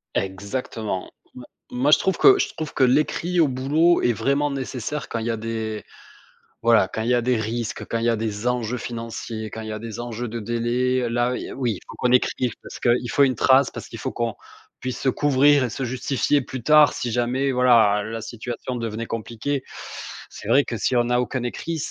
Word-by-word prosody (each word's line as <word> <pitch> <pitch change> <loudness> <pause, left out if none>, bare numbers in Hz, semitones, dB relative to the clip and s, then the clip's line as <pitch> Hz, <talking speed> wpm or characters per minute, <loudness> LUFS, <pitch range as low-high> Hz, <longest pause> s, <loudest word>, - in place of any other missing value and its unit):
Exactement. 100 +1 -3 0.2
M 125 - -9 0.3
moi 130 +4 +1
je 150 - +8
trouve 190 - 0
que 400 0 +7
je - - 0
trouve 155 -2 -5
que - - +2
l'écrit 155 +7 +2
au 160 - +5
boulot 145 +7 +2
est 120 - +3
vraiment 140 +5 0
nécessaire 135 +1 -4
quand 115 - -3
il 110 - -4
y 120 - 0
a 115 - -2
des 110 -1 -4 0.8
voilà, 115 -5 +5
quand 110 - -3
il 115 - -1
y - - +4
a 120 - +3
des 125 0 +1
risques, 115 +1 -3
quand 115 - -2
il 115 - -1
y - - +4
a 115 - +2
des 110 0 -3
enjeux 125 -1 -1
financiers, 115 -2 -5
quand 110 - -6
il 110 - -7
y - - -3
a 110 - -4
des 115 0 -7
enjeux 120 0 -4
de 115 +1 -5
délai, 120 +3 0
là 120 +1 +1 0.2
oui, 125 -4 0
il 95 - -8
faut - - -10
qu'on 125 - +1
écrive 125 -1 +2
parce - - -9
qu'il 120 0 +1
faut 140 - +4
une 130 -3 +3
trace, 130 +3 +4
parce - - -8
qu'il - - -9
faut - - -3
qu'on 115 -2 -2 0.5
puisse 130 -1 -4
se - - -2
couvrir 145 +1 +4
et 120 - -3
se 130 - -4
justifier 130 +3 0
plus 130 0 -7
tard 150 -1 +6
si 120 - -3
jamais, 125 +4 0
voilà, 115 -5 +5
la 110 +1 -5
situation 120 +3 -5
devenait 115 -1 -3
compliquée. 115 +5 -3 0.7
C'est - - -10
vrai 140 +1 +5
que 115 - -4
si 125 - 0
on 120 - +3
n'a 125 +1 +2
aucun 125 0 -3
écrit, 160 +7 -3
120 Hz, 220 wpm, -23 LUFS, 115-130 Hz, 0.8 s, je